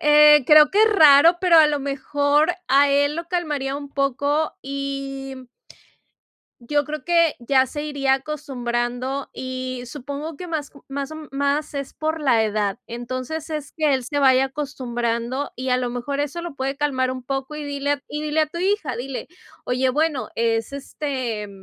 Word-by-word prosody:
Eh, 300 -1 +7
creo 300 -1 +7
que 420 +2 +4
es 440 -1 +4
raro, 320 0 +7
pero 350 -3 +6
a 310 - +8
lo 295 -1 0
mejor 285 +3 +1 0.2
a 280 +2 +5
él 285 +1 +2
lo 335 0 -5
calmaría 295 -6 -2
un 285 -1 -7
poco, 285 +3 0
y 275 -1 -5 1.2
yo 290 +4 +1
creo 305 0 -5
que 335 -3 +3
ya 260 +2 +3
se 295 +3 -6
iría 280 -3 +1
acostumbrando, 265 -2 -3
y 255 -1 -5
supongo 285 +4 -6
que 360 - -7
más 315 -4 -4 0.2
más 275 +1 -4
o 315 - -6 0.2
más 285 +2 -1
es 280 -1 -5
por 315 0 -2
la 240 -6 +3
edad. 210 -1 -1
Entonces 255 +7 -5
es 300 -2 -5
que 305 -3 +2
él 260 - -3
se 285 +4 -2
vaya 265 -1 +5
acostumbrando, 255 -2 -3
y 260 +1 -4
a 250 - +3
lo 250 -1 -2
mejor 245 +4 -4
eso 290 +3 -2
lo 345 -3 -6
puede 270 0 -3
calmar 260 -3 0
un 255 -1 -5
poco, 270 +3 -4
y 300 - -5
dile 285 0 -1
a 285 -1 -7
y 300 +1 -5
dile 305 +1 +1
a 310 - +3
tu 340 +3 -7
hija, 370 - 0
dile: 255 +2 -5 0.4
“Oye, 255 +1 +1
bueno, 300 0 0
es, 225 +1 0
este, 260 -6 -4
280 Hz, 180 wpm, -22 LUFS, 255-300 Hz, 1.2 s, a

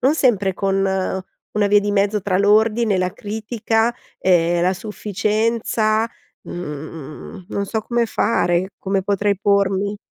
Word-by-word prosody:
non 270 +4 +3
sempre 210 -10 +2
con 195 +1 0 0.8
una 210 -1 +2
via 205 0 +5
di 205 - -1
mezzo 205 +1 +2
tra 185 -2 +1
l'ordine 215 +2 +3
e - - +1
la 185 0 0
critica, 225 +2 -1 0.2
ehm, 175 -1 +3
la 185 - +3
sufficienza, 215 +2 0 0.4
mhmm, 155 +2 -8
non 200 -2 -2
so 220 +2 -2
come 235 +1 0
fare, 185 -5 +1
come 195 0 -1
potrei 200 0 0
pormi? 200 0 +1
205 Hz, 135 wpm, -20 LUFS, 190-220 Hz, 0.8 s, via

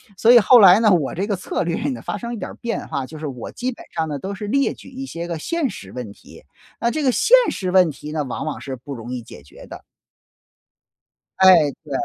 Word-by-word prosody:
所 225 +5 +4
以 245 - +9
后 235 +3 +6
来 190 0 +8
呢， 220 -2 +4
我 160 -7 +1
这 195 +4 -2
个 205 - 0
策 185 - -3
略 170 +7 -2
呢 260 - -5
发 - - -4
生 235 0 -6
一 235 - -5
点 - - -6
儿 - - -10
变 235 -1 -4
化， 135 -1 -3
就 155 +3 -11
是 155 - -5
我 125 -4 -7
基 255 +1 -3
本 - - -14
上 160 -1 -2
呢 150 -2 -4
都 195 +7 -5
是 210 +1 -6
列 275 +5 +1
举 - - -14
一 265 +1 -7
些 170 -8 -6
个 170 -2 -4
现 320 - -2
实 200 - -10
问 120 -5 -7
题， - - -17 0.4
那 235 - +1
这 310 +4 -2
个 260 - +3
现 - - +5
实 185 -2 -3
问 180 -3 +4
题 150 +1 -9
呢， 150 -2 -1
往 130 - -5
往 155 - -5
是 135 -2 -6
不 130 +4 -9
容 120 -1 -8
易 125 - -4
解 115 - -13
决 70 - -15
的。 - - -11 1.6
哎， 190 -1 +8 0.3
对。 150 - -13
180 Hz, 275 characters per minute, -21 LUFS, 145-235 Hz, 1.6 s, 以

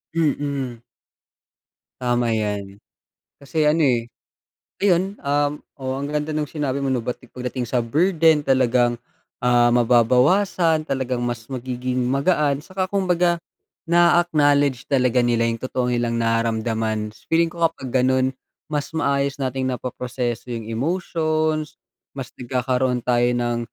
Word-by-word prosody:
Mm. 140 -6 -1 1.2
Tama 120 -2 +1
'yan. 105 -2 -3 0.6
Kasi 150 +2 0
ano, 155 +2 +3
eh. 120 -5 +2 0.7
Ayun, 195 0 +1
um, 145 +1 +1 0.3
oo 130 0 -2
ang 140 - -4
ganda 150 +1 -2
nung 150 -1 -1
sinabi 140 -3 -2
mo 135 - 0
'no 125 - 0
pagdating 125 +1 -5
sa 120 +1 0
burden 160 +4 +3
talagang, 125 -3 +2 0.4
ah, 120 -1 +4
mababawasan 130 - +3
talagang 130 -3 -2
mas 120 -2 -4
magiging 125 -1 -3
magaan 140 +2 +1
'tsaka 185 +4 -3
kumbaga, 180 -3 +1 0.5
naa-acknowledge 150 -6 +3
talaga 125 -2 +3
nila 115 -1 +2
yung 115 -1 -3
totoong 125 -1 -1
nilang 120 -1 0
nararamdaman, 110 -2 -1 0.2
feeling 165 +1 +3
ko 170 +1 -8
kapag 130 -5 -2
gano'n, 130 0 +3 0.4
mas 150 -2 -3
maayos 140 -3 0
nating 130 -1 -1
napoproseso 125 -1 -4
yung 115 -2 -5
emotions, 155 +3 -1 0.3
mas 135 -3 -8
nagkakaroon 125 0 -1
tayo 120 0 +2
ng, 120 -1 0
130 Hz, 120 wpm, -22 LUFS, 120-150 Hz, 1.2 s, ah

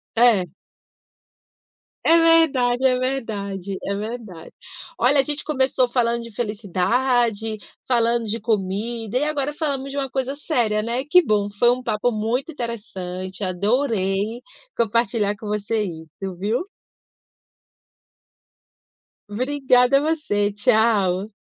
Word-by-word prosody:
É. 225 -6 +4 1.6
É 330 - +6
verdade, 285 -7 +3
é 255 -1 +2
verdade, 200 -7 -3
é 200 - -2
verdade. 210 -5 -7 0.4
Olha, 275 +3 +4
a - - +5
gente 295 +2 -1
começou 265 -3 +1
falando 235 -1 0
de 230 -1 -11
felicidade, 220 +2 0 0.3
falando 235 -1 +2
de 225 +1 -2
comida, 220 +2 -2
e 270 - +1
agora 295 -1 -1
falamos 280 -3 -3
de 280 - -6
uma 270 -1 -2
coisa 265 +1 -2
séria, 240 -8 0
né, 235 +4 -1
que 360 +6 +5
bom! 210 - 0
Foi 240 - +5
um 250 +1 0
papo 220 0 0
muito 240 +7 -2
interessante. 190 -6 -5
Adorei 205 +2 0 0.4
compartilhar 225 -2 +1
com 215 - -9
você 210 +1 -1
isso, 170 +1 -7
viu. 215 - -1 2.7
Obrigada, 255 +2 +2
você. 290 -10 0
Tchau. 205 -2 +2
230 Hz, 115 wpm, -22 LUFS, 205-260 Hz, 2.7 s, É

